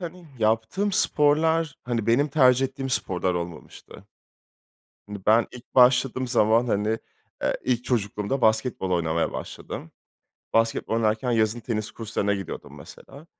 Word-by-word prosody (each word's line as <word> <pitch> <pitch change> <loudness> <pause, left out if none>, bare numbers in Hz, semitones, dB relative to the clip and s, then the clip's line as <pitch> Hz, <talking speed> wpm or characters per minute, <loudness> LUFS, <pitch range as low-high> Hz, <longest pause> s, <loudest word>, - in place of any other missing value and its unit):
hani, 175 0 -8
yaptığım 110 - 0
sporlar, 155 -1 +2
hani, 115 -3 -2
benim 135 +6 +3
tercih 130 -2 +4
ettiğim 135 0 -6
sporlar 90 -6 -1
olmamıştı. 85 -2 -8 1.0
Hani, 105 0 -7
ben 110 +2 +5
ilk 125 0 -13
başladığım 130 0 +4
zaman, 115 -1 +3
hani, 110 0 0 0.4
eee, - - +1
ilk 125 -1 0
çocukluğumda 105 +2 -1
basketbol 110 -3 +1
oynamaya 85 -2 0
başladım. 80 - -7 0.6
Basketbol 115 0 +1
oynarken 115 +2 0
yazın 110 0 +1
tenis 110 -2 -3
kurslarına 105 -2 -2
gidiyordum 95 -3 -7
mesela 145 +4 -13
115 Hz, 125 wpm, -25 LUFS, 105-135 Hz, 1.0 s, ben